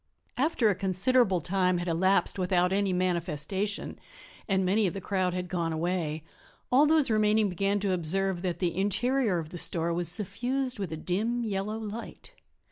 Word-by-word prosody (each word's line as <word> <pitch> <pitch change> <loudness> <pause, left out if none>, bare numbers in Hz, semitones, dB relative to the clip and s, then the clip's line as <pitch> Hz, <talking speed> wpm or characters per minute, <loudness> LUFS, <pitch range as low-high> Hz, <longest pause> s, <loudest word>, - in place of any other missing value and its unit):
After 270 -3 +1
a 205 - +4
considerable 195 +1 +2
time 185 +1 +1
had 175 +1 -4
elapsed 185 +3 +2
without 180 0 +2
any 200 -1 +1
manifestation, 180 +2 -2 0.5
and 190 -3 +1
many 200 +3 +2
of 175 - -4
the - - -3
crowd 185 -2 -1
had 180 0 -3
gone 170 -2 -2
away, 160 -2 -2 0.5
all 280 +4 +5
those 310 -5 +3
remaining 215 -1 +3
began 195 +3 0
to 200 -2 0
observe 180 +2 0
that 180 -2 -2
the 175 -3 -1
interior 215 +2 +1
of 160 -2 -5
the 175 - -6
store 170 0 0
was 170 -1 0
suffused 250 +7 -1
with 195 -4 -4
a 160 - -4
dim, 220 +9 -1
yellow 210 0 -2
light. 220 - -8
190 Hz, 170 wpm, -28 LUFS, 175-215 Hz, 0.5 s, all